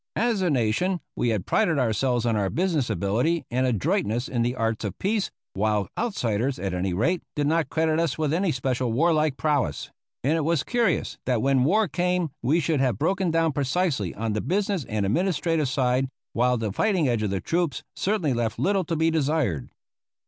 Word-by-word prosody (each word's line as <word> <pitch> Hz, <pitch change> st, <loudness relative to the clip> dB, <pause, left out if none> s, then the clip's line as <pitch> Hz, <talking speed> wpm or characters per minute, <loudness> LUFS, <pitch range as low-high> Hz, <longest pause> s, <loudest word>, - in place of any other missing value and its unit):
As 230 Hz, -3 st, +1 dB
a 180 Hz, -, +2 dB
nation 140 Hz, -, +1 dB, 0.2 s
we 120 Hz, -, 0 dB
had 105 Hz, -5 st, -1 dB
prided 160 Hz, -3 st, +2 dB
ourselves 125 Hz, 0 st, +1 dB
on 115 Hz, -2 st, +1 dB
our 100 Hz, -2 st, 0 dB
business 165 Hz, -, 0 dB
ability 120 Hz, +10 st, 0 dB
and 130 Hz, +2 st, +1 dB
adroitness 125 Hz, -, 0 dB
in 120 Hz, -2 st, -1 dB
the 120 Hz, +2 st, 0 dB
arts 115 Hz, -2 st, -1 dB
of 105 Hz, -4 st, -4 dB
peace, 205 Hz, +1 st, 0 dB, 0.2 s
while 105 Hz, 0 st, 0 dB
outsiders, 130 Hz, -, -1 dB
at 95 Hz, -2 st, -3 dB
any 90 Hz, +1 st, -1 dB
rate, 150 Hz, -, +1 dB
did 145 Hz, -, 0 dB
not 160 Hz, +2 st, +1 dB
credit 160 Hz, 0 st, +1 dB
us 165 Hz, -5 st, 0 dB
with 155 Hz, -2 st, 0 dB
any 185 Hz, +3 st, +1 dB
especial 125 Hz, -3 st, -1 dB
warlike 155 Hz, +1 st, +2 dB
prowess; 150 Hz, -4 st, -1 dB, 0.3 s
and 140 Hz, +5 st, +2 dB
it 165 Hz, -, 0 dB
was 160 Hz, -2 st, +1 dB
curious 240 Hz, -2 st, 0 dB
that 125 Hz, -4 st, +1 dB
when 135 Hz, -2 st, +3 dB
war 210 Hz, +7 st, +3 dB
came 180 Hz, -3 st, 0 dB
we 145 Hz, +8 st, +2 dB
should 155 Hz, -2 st, 0 dB
have 130 Hz, -6 st, +1 dB
broken 185 Hz, -, +1 dB
down 165 Hz, 0 st, +2 dB
precisely 140 Hz, -, 0 dB
on 110 Hz, 0 st, -2 dB
the 105 Hz, -, -1 dB
business 195 Hz, -4 st, -1 dB
and 105 Hz, -2 st, -1 dB
administrative 165 Hz, -, +1 dB
side, 130 Hz, 0 st, +1 dB, 0.2 s
while 125 Hz, +1 st, +2 dB
the 110 Hz, -3 st, -2 dB
fighting 185 Hz, -, +1 dB
edge 120 Hz, -3 st, +1 dB
of 105 Hz, -, 0 dB
the 95 Hz, 0 st, -1 dB
troops 165 Hz, -, -1 dB
certainly 185 Hz, -9 st, 0 dB
left 115 Hz, -2 st, -1 dB
little 195 Hz, 0 st, +1 dB
to 165 Hz, 0 st, -2 dB
be 160 Hz, +1 st, +2 dB
desired. 145 Hz, -, 0 dB
140 Hz, 190 wpm, -25 LUFS, 115-170 Hz, 0.3 s, when